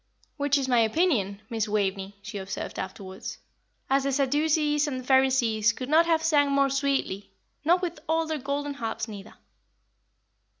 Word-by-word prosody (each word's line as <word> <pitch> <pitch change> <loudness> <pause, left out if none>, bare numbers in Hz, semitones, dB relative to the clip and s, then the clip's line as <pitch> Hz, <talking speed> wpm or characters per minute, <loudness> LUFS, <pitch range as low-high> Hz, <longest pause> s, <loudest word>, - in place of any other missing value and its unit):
"Which 285 -1 +1
is 270 -2 -1
my 245 -2 +3
opinion, 220 - +1
Miss 225 -1 -2
Waveney," 200 -1 -1
she 205 -1 -6
observed 190 0 -5
afterwards, 190 0 -7 0.5
"as 270 0 +2
the 275 - 0
Sadducees 295 +2 +2
and 255 -3 -4
Pharisees 255 -5 +3
could 255 0 -6
not 325 +2 +5
have 325 -1 +2
sang 290 -3 +3
more 275 -1 +3
sweetly, 275 -8 -1 0.3
not 350 +4 +3
with 340 -3 -3
all 325 0 +2
their 315 -1 -3
golden 285 +2 -3
harps 225 -3 -4
neither." 205 -1 -10
270 Hz, 155 wpm, -27 LUFS, 215-295 Hz, 0.5 s, not